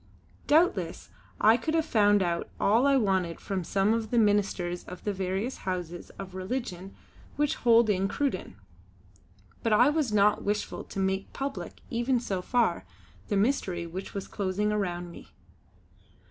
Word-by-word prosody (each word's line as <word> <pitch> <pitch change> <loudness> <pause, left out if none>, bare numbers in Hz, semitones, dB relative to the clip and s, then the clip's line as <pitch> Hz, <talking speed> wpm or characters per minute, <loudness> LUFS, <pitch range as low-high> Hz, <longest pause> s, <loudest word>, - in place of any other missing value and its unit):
Doubtless 330 +5 +2 0.3
I 220 +2 +6
could 315 +7 -2
have 320 -1 +2
found 205 -7 +4
out 170 -1 -2
all 230 +7 +4
I 280 - +4
wanted 190 -7 0
from 190 -2 -3
some 195 +5 +1
of 225 -1 -2
the 240 - 0
ministers 195 -5 +1
of 180 - -10
the 205 - -1
various 195 +6 -2
houses 175 -2 -5
of 190 -1 -8
religion 190 -1 -5 0.4
which 295 -1 +1
hold 235 -1 +5
in 195 -2 +1
Cruden; 230 - -2 1.1
but 230 - 0
I 245 +7 +5
was 300 -6 0
not 210 0 +3
wishful 205 +1 -2
to - - -10
make 190 0 -1
public, 275 0 -5
even 240 +1 +1
so 195 -6 -3
far, 225 - +1 0.4
the 205 - 0
mystery 195 -6 0
which 185 +5 -7
was 200 - -4
closing 205 +1 -1
around 175 -4 -2
me. - - -13
205 Hz, 155 wpm, -28 LUFS, 185-235 Hz, 1.1 s, I